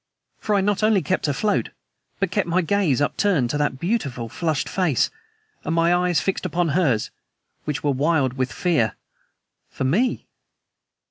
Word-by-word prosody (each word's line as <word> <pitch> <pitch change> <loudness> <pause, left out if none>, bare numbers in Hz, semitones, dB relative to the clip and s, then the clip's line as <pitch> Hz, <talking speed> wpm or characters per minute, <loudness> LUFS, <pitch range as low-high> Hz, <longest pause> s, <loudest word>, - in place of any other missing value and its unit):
For 210 - 0
I 200 - +3
not 205 +1 0
only 215 -3 +3
kept 185 -4 0
afloat, 205 +9 0 0.5
but 195 -3 0
kept 195 -1 0
my 175 +2 +1
gaze 165 -6 +1
upturned 145 - +1
to 150 - -1
that 145 -3 0
beautiful, 140 - -2
flushed 160 +2 -1
face, 175 -9 +1 0.5
and 160 - -1
my 170 +1 +3
eyes 175 -2 +2
fixed 195 - -2
upon 175 -1 0
hers 135 -9 +1 0.5
which 150 -1 -3
were 145 - +2
wild 140 -1 +1
with 130 -1 -2
fear... 150 - +1 0.7
for - - -5
me! 205 - +1
165 Hz, 155 wpm, -23 LUFS, 140-190 Hz, 0.7 s, I